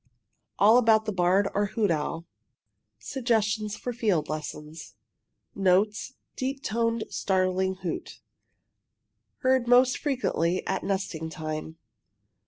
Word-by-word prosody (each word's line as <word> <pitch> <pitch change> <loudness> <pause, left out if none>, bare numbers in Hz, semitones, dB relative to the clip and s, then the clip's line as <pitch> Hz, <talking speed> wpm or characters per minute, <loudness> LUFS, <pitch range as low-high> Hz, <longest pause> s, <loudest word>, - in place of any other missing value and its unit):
ALL 220 +4 +6
ABOUT 220 -2 +4
THE 215 - -1
BARRED 190 +1 +2
OR 205 +1 +1
HOOT 205 -2 0
OWL 165 +2 -2 0.7
SUGGESTIONS 220 -5 -1
FOR 245 - -4
FIELD 200 -10 0
LESSONS 155 +1 -7 0.6
Notes 200 +6 +1 0.2
deep 270 +1 -3
toned, 230 0 0
startling 190 0 0
hoot. 170 - -5 1.2
Heard 260 -2 +2
most 250 +1 +5
frequently 185 - 0
at - - -2
nesting 185 -5 -2
time. 155 0 -6
200 Hz, 105 wpm, -27 LUFS, 175-230 Hz, 1.2 s, ALL